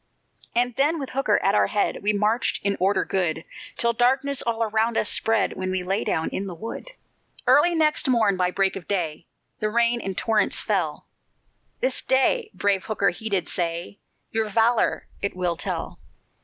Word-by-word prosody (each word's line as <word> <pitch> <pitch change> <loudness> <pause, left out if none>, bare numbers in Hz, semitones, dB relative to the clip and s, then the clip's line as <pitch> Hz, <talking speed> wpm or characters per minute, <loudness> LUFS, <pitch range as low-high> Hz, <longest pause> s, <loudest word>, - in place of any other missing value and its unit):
And 245 +1 +2
then 295 +5 +2
with 275 - -5
Hooker 260 -6 +2
at 195 - +3
our - - +3
head, 205 - 0
We 210 - +2
marched 210 +3 +1
in 200 0 +2
order 195 +3 +2
good, 165 -4 -1 0.3
Till 235 0 +2
darkness 265 +4 +1
all 230 -1 0
around 220 +1 0
us - - +2
spread, 225 -1 +2
When 185 0 -4
we 185 -1 -1
lay 195 +3 -1
down 160 - -1
in 195 - -4
the 180 - -6
wood. 225 - -7 0.6
Early 345 +4 +5
next 305 -2 +2
morn 225 -6 +3
by 180 -1 +1
break 195 +1 0
of 190 -3 -8
day, 170 -5 -2 0.3
The 215 - 0
rain 235 +1 +2
in 195 -2 -4
torrents 220 +1 +2
fell; 175 -8 -1 0.8
"This 255 - 0
day," 425 - +2
brave 200 -2 +1
Hooker 200 -4 +1
he 220 +5 -6
did 195 -4 0
say, 170 +3 -3 0.3
"Your 220 -1 -1
valor 225 +2 +2 0.2
it 200 - -2
will 180 -2 -1
tell. - - -4
210 Hz, 180 wpm, -24 LUFS, 185-235 Hz, 0.8 s, Early